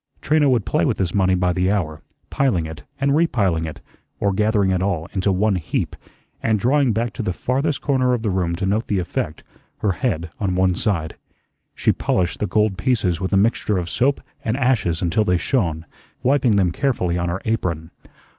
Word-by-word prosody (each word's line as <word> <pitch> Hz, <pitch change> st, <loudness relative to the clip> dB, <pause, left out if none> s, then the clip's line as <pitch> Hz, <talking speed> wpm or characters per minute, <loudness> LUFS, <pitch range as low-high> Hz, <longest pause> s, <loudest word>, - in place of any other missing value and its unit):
Trina 150 Hz, -1 st, +3 dB
would 120 Hz, -6 st, +2 dB
play -, -, +1 dB
with -, -, +1 dB
this 95 Hz, -3 st, -1 dB
money 95 Hz, -2 st, +3 dB
by 90 Hz, 0 st, +1 dB
the 90 Hz, +2 st, +1 dB
hour, 80 Hz, -7 st, -2 dB, 0.3 s
piling 120 Hz, -12 st, +1 dB
it, 80 Hz, -1 st, -8 dB, 0.2 s
and 140 Hz, +1 st, +2 dB
repiling 100 Hz, -, +1 dB
it, 80 Hz, -, -7 dB, 0.4 s
or 100 Hz, -1 st, +1 dB
gathering 105 Hz, -1 st, +2 dB
it 90 Hz, -1 st, +1 dB
all 90 Hz, -5 st, -1 dB
into 95 Hz, 0 st, +1 dB
one 100 Hz, +1 st, +2 dB
heap, 80 Hz, -, -2 dB, 0.5 s
and 110 Hz, -1 st, +2 dB
drawing 130 Hz, +4 st, +2 dB
back 115 Hz, 0 st, -1 dB
to -, -, -4 dB
the 100 Hz, -, -1 dB
farthest 135 Hz, -, -1 dB
corner 130 Hz, -3 st, +2 dB
of 115 Hz, -, -5 dB
the 105 Hz, -, 0 dB
room 90 Hz, -2 st, 0 dB
to 95 Hz, +3 st, -2 dB
note 105 Hz, +4 st, 0 dB
the 100 Hz, -, 0 dB
effect, 85 Hz, -3 st, -3 dB, 0.3 s
her 105 Hz, -, 0 dB
head 85 Hz, -5 st, -2 dB
on 95 Hz, -3 st, 0 dB
one 95 Hz, 0 st, +3 dB
side. 85 Hz, -4 st, -2 dB, 0.6 s
She -, -, +2 dB
polished 90 Hz, -2 st, -1 dB
the 105 Hz, -, 0 dB
gold 105 Hz, 0 st, +1 dB
pieces 100 Hz, -9 st, +1 dB
with 95 Hz, -, -2 dB
a 100 Hz, -, +3 dB
mixture 105 Hz, -1 st, +2 dB
of 85 Hz, -2 st, -3 dB
soap 135 Hz, -, +1 dB, 0.2 s
and 110 Hz, +3 st, -1 dB
ashes 110 Hz, -, +1 dB
until 90 Hz, +5 st, +2 dB
they 90 Hz, -3 st, +2 dB
shone, 85 Hz, -, -1 dB, 0.4 s
wiping 130 Hz, -4 st, +3 dB
them 95 Hz, -3 st, +3 dB
carefully 90 Hz, -8 st, 0 dB
on 85 Hz, 0 st, -1 dB
her 85 Hz, +2 st, -2 dB
apron. 90 Hz, -7 st, -2 dB
95 Hz, 200 wpm, -21 LUFS, 90-115 Hz, 0.6 s, Trina